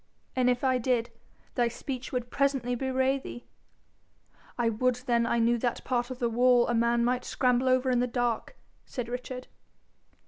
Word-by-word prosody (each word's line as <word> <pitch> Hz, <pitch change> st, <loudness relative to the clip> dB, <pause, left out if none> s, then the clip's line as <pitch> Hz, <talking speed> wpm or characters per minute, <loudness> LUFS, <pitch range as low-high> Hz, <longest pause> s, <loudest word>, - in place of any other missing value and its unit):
'And 250 Hz, -1 st, +3 dB
if 245 Hz, +1 st, 0 dB
I 260 Hz, -1 st, +2 dB
did, 240 Hz, -1 st, 0 dB, 0.4 s
thy 240 Hz, -1 st, +2 dB
speech 255 Hz, +2 st, -5 dB
would 245 Hz, -1 st, -3 dB
presently 270 Hz, -3 st, +1 dB
bewray 265 Hz, +2 st, +1 dB
thee.' 240 Hz, -2 st, -9 dB, 1.1 s
'I 235 Hz, -2 st, +2 dB
would 250 Hz, +3 st, +1 dB
then 235 Hz, -1 st, +2 dB
I 235 Hz, -, +1 dB
knew 235 Hz, +1 st, +2 dB
that 240 Hz, 0 st, -2 dB
part 245 Hz, -1 st, -1 dB
of 255 Hz, -, -6 dB
the 240 Hz, -, 0 dB
wall 245 Hz, +1 st, +4 dB
a 240 Hz, -, 0 dB
man 235 Hz, 0 st, +2 dB
might 250 Hz, +1 st, 0 dB
scramble 250 Hz, 0 st, +1 dB
over 255 Hz, 0 st, +3 dB
in 245 Hz, -, +2 dB
the 250 Hz, -, +1 dB
dark,' 245 Hz, -, -2 dB, 0.3 s
said 245 Hz, -3 st, -4 dB
Richard. 250 Hz, +1 st, -6 dB
245 Hz, 175 wpm, -28 LUFS, 240-255 Hz, 1.1 s, wall